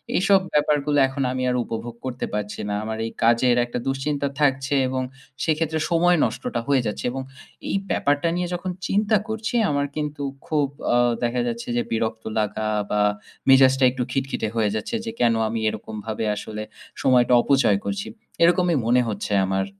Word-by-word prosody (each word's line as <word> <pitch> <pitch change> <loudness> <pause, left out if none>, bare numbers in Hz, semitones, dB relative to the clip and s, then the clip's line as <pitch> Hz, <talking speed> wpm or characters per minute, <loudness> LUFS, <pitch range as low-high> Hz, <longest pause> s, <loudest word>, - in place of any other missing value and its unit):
এইসব 195 +1 +5
ব্যাপারগুলো 150 0 +2
এখন 135 +1 -3
আমি 130 0 -2
আর 125 - 0
উপভোগ 115 +1 -6
করতে 130 -1 -3
পারছি 105 0 -3
না। - - -1
আমার 110 0 -4
এই 115 - -4
কাজের 120 +2 +4
একটা 120 - -4
দুশ্চিন্তা 140 +1 -1
থাকছে 135 -1 +2
এবং 130 0 -1 0.4
সেক্ষেত্রে 160 0 0
সময় 175 +1 +4
নষ্টটা 120 +1 -3
হয়ে 140 -2 +3
যাচ্ছে 105 - -4
এবং 135 +1 -4 0.5
এই - - 0 0.2
ব্যাপারটা 145 +3 +1
নিয়ে 180 0 -1
যখন 180 +1 -3 0.2
চিন্তা 210 +2 +2
করছি 220 +2 -3
আমার 140 -1 +1
কিন্তু 150 -1 -3 0.2
খুব 150 -3 +1 0.3
আ - - +5 0.3
দেখা 120 +1 0
যাচ্ছে 115 0 -4
যে 120 - +2
বিরক্ত 110 0 -1 0.2
লাগা 110 0 -1 0.2
বা 105 - +2 0.5
মেজাজটা 135 0 +6
একটু 125 0 -2
খিটখিটে 135 -3 -2
হয়ে 110 -2 +2
যাচ্ছে 110 - -3
যে 225 - -3
কেন 120 -1 +4 0.2
আমি 115 0 -2
এরকমভাবে 110 +1 -5
আসলে 105 +1 -6 0.4
সময়টা 125 -1 +4
অপচয় 135 -8 +3
করছি? 200 0 -3 0.4
এরকমই 175 -1 +4
মনে 125 +2 +4
হচ্ছে 105 0 -4
আমার। 95 0 0
130 Hz, 165 wpm, -23 LUFS, 115-150 Hz, 0.5 s, মেজাজটা